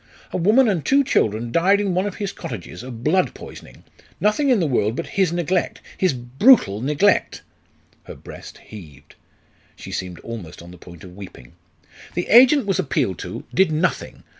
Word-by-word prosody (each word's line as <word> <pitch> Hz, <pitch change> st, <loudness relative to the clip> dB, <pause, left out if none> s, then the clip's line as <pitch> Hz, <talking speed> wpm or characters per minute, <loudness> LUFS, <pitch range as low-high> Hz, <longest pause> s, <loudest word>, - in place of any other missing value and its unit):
A -, -, -2 dB
woman 215 Hz, +9 st, +4 dB
and 185 Hz, -8 st, 0 dB
two 280 Hz, +1 st, +3 dB
children 115 Hz, -, 0 dB
died 190 Hz, +7 st, +3 dB
in 200 Hz, -3 st, -1 dB
one 185 Hz, +3 st, 0 dB
of 200 Hz, -, -6 dB
his 200 Hz, -2 st, -4 dB
cottages 90 Hz, -6 st, -8 dB
of 120 Hz, -2 st, -9 dB
blood 185 Hz, +6 st, +1 dB
poisoning -, -, -13 dB, 0.4 s
nothing 215 Hz, +8 st, +1 dB
in 245 Hz, -5 st, +3 dB
the 170 Hz, -, +1 dB
world 115 Hz, -6 st, 0 dB
but 170 Hz, -, -4 dB
his 190 Hz, -4 st, 0 dB
neglect 175 Hz, +1 st, -1 dB, 0.2 s
his 185 Hz, -2 st, +1 dB
brutal 125 Hz, -, +3 dB
neglect!" 150 Hz, +10 st, +1 dB, 0.6 s
Her -, -, -10 dB
breast -, -, -12 dB
heaved; 75 Hz, -9 st, -14 dB, 0.6 s
she -, -, -11 dB
seemed 90 Hz, -2 st, -5 dB
almost 95 Hz, -8 st, -9 dB
on 85 Hz, -, -13 dB
the 90 Hz, -, -14 dB
point 85 Hz, -2 st, -14 dB
of 90 Hz, -1 st, -12 dB
weeping. 90 Hz, -11 st, -12 dB, 0.6 s
"The 175 Hz, -, -3 dB
agent 260 Hz, +3 st, +6 dB
was 195 Hz, -1 st, -1 dB
appealed 130 Hz, -, -1 dB
to -, -, -7 dB
did 190 Hz, -3 st, +3 dB
nothing. 160 Hz, +3 st, -2 dB
160 Hz, 175 wpm, -21 LUFS, -, 0.6 s, agent